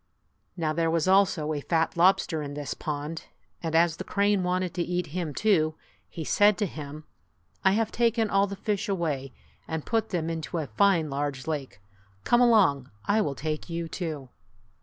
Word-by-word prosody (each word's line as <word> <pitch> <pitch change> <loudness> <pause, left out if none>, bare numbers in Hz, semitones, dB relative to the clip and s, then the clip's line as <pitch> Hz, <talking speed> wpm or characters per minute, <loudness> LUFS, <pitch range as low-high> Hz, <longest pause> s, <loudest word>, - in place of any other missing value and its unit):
Now 155 -2 0
there 165 +1 +1
was 165 +1 +1
also 185 -5 +3
a 145 - -3
fat 165 +1 0
lobster 170 -2 +3
in 145 -1 -6
this 145 -2 -4
pond, 150 +2 -5 0.4
and 160 -1 -2
as 165 0 +3
the - - -5
crane 200 -1 +1
wanted 180 0 -1
to 175 - -2
eat 175 0 -1
him 175 -4 -2
too, 155 -3 +2 0.3
he 165 - -6
said 205 +6 +4
to 210 - +1
him, 150 -3 -7 0.6
"I 190 - +5
have 220 +1 0
taken 230 -1 +2
all 200 0 +2
the 200 - -5
fish 205 0 -2
away 150 -8 -2 0.4
and 160 -2 -4
put 225 -1 0
them 170 -4 -1
into 160 -3 -3
a 160 - -1
fine 170 -2 +2
large 140 -1 -3
lake. 140 -10 -4 0.4
Come 240 0 +4
along. 195 - +4 0.2
I 215 +2 +3
will 145 -8 -1
take 155 +4 -4
you, 170 0 -3
too 155 -6 -5
165 Hz, 180 wpm, -27 LUFS, 150-195 Hz, 0.6 s, I